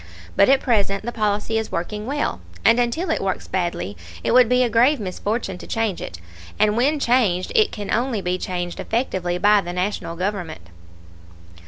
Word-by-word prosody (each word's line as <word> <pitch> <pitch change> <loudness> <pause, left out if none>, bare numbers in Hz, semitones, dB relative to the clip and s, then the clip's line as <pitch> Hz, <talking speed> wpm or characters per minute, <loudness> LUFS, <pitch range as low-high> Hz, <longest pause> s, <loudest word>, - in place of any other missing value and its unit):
But 200 - +5
at 270 0 +5
present 200 -4 +1
the 240 - -2
policy 215 0 0
is 220 - -5
working 210 +6 -4
well, 280 - -2 0.2
and 230 - +6
until 280 +9 0
it - - 0
works 190 -1 -2
badly 175 - -2 0.3
it - - 0
would 250 -2 +6
be 250 0 +4
a - - +2
grave 245 +5 +3
misfortune 200 0 -3
to - - -10
change 225 -5 -1
it, 85 - -7 0.4
and 210 0 +3
when 285 +6 +2
changed 230 -9 +2
it 440 -3 +4
can 205 -3 -4
only 240 -1 0
be 180 -1 -2
changed 175 -1 -4
effectively 190 -7 -1
by 205 +2 +4
the 175 -1 -6
National 180 -2 -2
Government. 175 - -4
210 Hz, 180 wpm, -22 LUFS, 180-240 Hz, 0.4 s, and